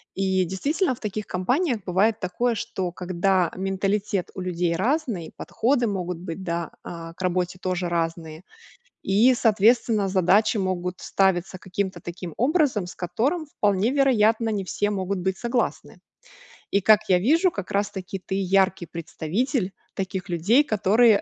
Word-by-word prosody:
И, 190 -1 +1
действительно, 280 - 0
в - - -20
таких 210 -1 -4
компаниях 245 - 0
бывает 205 +5 +2
такое, 230 +6 -1
что 185 -4 -3
когда 180 0 0
менталитет 195 0 -1
у 190 - -6
людей 175 -2 -1
разный, 230 - -1
подходы 245 0 0
могут 180 -3 -3
быть, 180 +1 -6
да, 170 -2 -3
а, 165 -1 -8
к 185 - -13
работе 180 0 -1
тоже 180 -1 -1
разные. 165 -1 -3 0.6
И, 220 +7 +4
соответственно, 220 -1 +3
задачи 200 +4 +3
могут 180 -1 -2
ставиться 190 -1 0
каким-то 190 -2 -3
таким 175 -1 -7
образом, 255 - +2
с - - -9
которым, 255 - -1
вполне 210 -4 +1
вероятно, 230 -5 +3
не 205 -3 -1
все 205 +3 -1
могут 195 -1 -2
быть 190 +1 -1
согласны. 240 0 -2 0.7
И, 200 - +2
как 215 +2 +6
я 180 -1 +5
вижу, 330 - +3
как 200 -7 -6
раз-таки 200 -2 -2
ты 190 - -2
яркий 190 -1 +2
представитель 185 - -2 0.2
таких 190 -1 -4
людей, 200 - +3
которые,, 215 -1 +4
195 Hz, 145 wpm, -24 LUFS, 180-220 Hz, 0.7 s, как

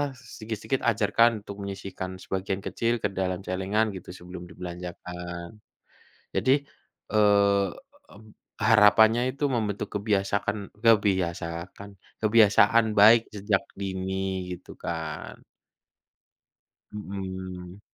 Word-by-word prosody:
sedikit-sedikit 115 -1 -4
ajarkan 115 0 +3
untuk 100 -1 -9
menyisihkan 95 -1 -6
sebagian 95 0 -3
kecil 115 0 -1
ke 105 - 0
dalam 95 0 -2
celengan 100 +4 0
gitu, 95 - -10
sebelum 90 0 -10
dibelanjakan. 90 +1 -8 0.8
Jadi, 135 +2 +3 0.5
eee, 100 -2 +4 0.5
mmm, 110 0 -16 0.3
harapannya 110 +2 +6
itu 145 - -2
membentuk 105 -4 -2
kebiasakan 100 0 -1
kebiasakan 95 -3 +1 0.3
kebiasaan 110 +1 +5
baik 110 +2 +8
sejak 100 -1 0 0.2
dini, 95 -1 -3
gitu - - -14
kan. 80 -2 -6 1.5
Mhm. 95 -2 -7
100 Hz, 90 wpm, -26 LUFS, 95-110 Hz, 1.5 s, baik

